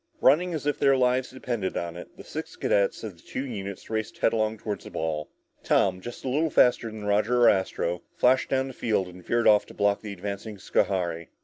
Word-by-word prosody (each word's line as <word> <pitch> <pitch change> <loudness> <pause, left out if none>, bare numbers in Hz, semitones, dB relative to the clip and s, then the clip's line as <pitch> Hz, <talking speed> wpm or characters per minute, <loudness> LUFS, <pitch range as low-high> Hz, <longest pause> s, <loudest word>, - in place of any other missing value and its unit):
Running 170 +6 +4
as 150 - -5
if 145 - 0
their 135 -1 +4
lives 125 0 +2
depended 120 -6 -3
on 85 -1 -3
it, 90 - -11
the - - -10
six - - -7
cadets 100 +2 +1
of 105 -6 -6
the - - -20
two 130 - -5
units 100 -6 -6
raced 110 -1 -3
headlong 110 -1 +1
toward 105 -1 -4
the - - -10
ball. 80 -1 -3 0.3
Tom, 95 -2 +2
just 120 +6 -8
a - - -2
little 150 +5 +1
faster 125 -4 +4
than 110 -1 -8
Roger 105 +4 +2
or 115 - +8
Astro, 90 -2 0
flashed 130 +1 +3
down 135 0 +1
the - - -8
field 105 -6 0
and 90 0 -12
veered 120 +4 +1
off 105 -1 +5
to - - -13
block 100 0 +2
the 105 - -6
advancing 100 +2 -6
Schohari. 85 -3 0
110 Hz, 215 wpm, -26 LUFS, 95-125 Hz, 0.3 s, or